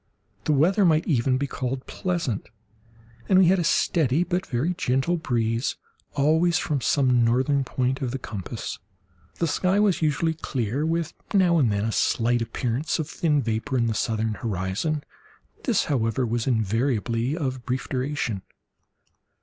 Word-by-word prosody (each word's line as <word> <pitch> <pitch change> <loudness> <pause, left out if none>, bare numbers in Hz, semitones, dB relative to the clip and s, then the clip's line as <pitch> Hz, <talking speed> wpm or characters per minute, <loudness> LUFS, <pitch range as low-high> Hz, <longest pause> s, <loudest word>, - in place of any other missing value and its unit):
The - - +2
weather 180 +9 +3
might 160 -3 +3
even 130 -3 +2
be 140 - -1
called 130 -1 -4
pleasant, 170 - -3 0.8
and 190 - +5
we 190 - +7
had 190 0 +4
a - - +1
steady 160 -1 +2
but 180 +1 -2
very 140 +8 0
gentle 135 +2 0
breeze 115 -6 -1 0.4
always 160 +4 +3
from 145 -3 -1
some 125 -3 +3
northern 130 +4 +2
point 130 +1 -1
of 130 - -1
the 135 - -3
compass. 105 -7 -6 0.6
The 170 - 0
sky 185 +5 +1
was 205 -5 +2
usually 160 +1 +1
clear, 135 -1 -2
with 165 0 -1 0.2
now 175 -4 +4
and 125 -7 +3
then 100 +1 0
a 115 - 0
slight 120 +2 +1
appearance 120 +5 -1
of 160 -3 -3
thin 155 -4 +1
vapour 115 +4 -1
in 120 - +2
the 115 - 0
southern 110 0 -1
horizon—this, 115 - -3
however, 125 -3 0
was 120 +1 -1
invariably 115 - 0
of 130 -6 -3
brief 125 +1 -2
duration. 130 -6 -2
135 Hz, 150 wpm, -25 LUFS, 115-160 Hz, 0.8 s, we